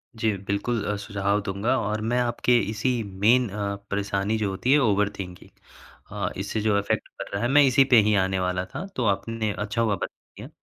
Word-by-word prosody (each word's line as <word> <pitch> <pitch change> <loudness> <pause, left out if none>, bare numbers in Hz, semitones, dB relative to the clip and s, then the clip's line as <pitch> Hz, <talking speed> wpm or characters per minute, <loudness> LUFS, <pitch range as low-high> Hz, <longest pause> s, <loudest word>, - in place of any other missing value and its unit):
जी, 110 -1 +1
बिल्कुल 100 +3 -2
अ, 105 - -1
सुझाव 100 0 -1
दूँगा 100 +6 -1
और 105 0 -2
मैं 120 +3 0
आपके 120 0 +2
इसी 115 +3 0
मेन 105 +5 +2
अ, 100 0 -3 0.2
परेशानी 100 +1 -1
जो 105 -2 -1
होती 100 +7 -1
है, 150 - +6
ओवर 105 -5 +2
थिंकिंग 90 -2 -8 0.6
अ, 100 -3 -2
इससे 105 +2 -3
जो 105 -1 +2
इफ़ेक्ट 100 - -2
पड़ - - -4
रहा 100 - -1
है, 120 - +1
मैं 145 +2 +6
इसी 135 0 +5
पे - - +9
ही 105 +1 +2
आने 95 -1 +1
वाला 90 0 -1
था। 135 - -7
तो 125 - -1
आपने, 110 +2 -1
अच्छा 105 +3 -2
हुआ, 110 -3 +2
बता - - -3 0.3
दिया। - - -9
105 Hz, 210 wpm, -25 LUFS, 100-115 Hz, 0.6 s, पे